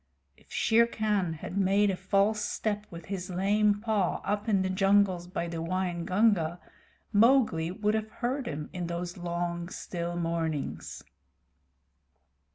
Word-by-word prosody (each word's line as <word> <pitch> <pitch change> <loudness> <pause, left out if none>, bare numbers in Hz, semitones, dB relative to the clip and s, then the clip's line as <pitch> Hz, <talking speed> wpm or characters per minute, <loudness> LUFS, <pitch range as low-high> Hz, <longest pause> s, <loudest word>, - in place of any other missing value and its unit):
If - - -25
Shere 230 +1 +4
Khan 210 -7 0
had 175 +5 -5
made 200 +1 +3
a - - -1
false 200 +3 +1
step 210 0 -2
with 170 -1 -9
his 190 -1 -5
lame 205 +3 +2
paw 215 -5 +1
up 205 +2 -1
in 195 -3 +3
the 190 - -1
jungles 195 -2 +3
by 170 -1 -3
the 165 -1 -4
Waingunga, 180 0 +1 0.5
Mowgli 215 -7 +4
would 210 +3 0
have 220 0 -1
heard 250 +4 -3
him 150 0 -5
in 180 -2 -3
those 175 +1 -4
long, 175 0 -3
still 175 -1 -4
mornings. 165 -3 -3
190 Hz, 140 wpm, -29 LUFS, 170-210 Hz, 0.5 s, Shere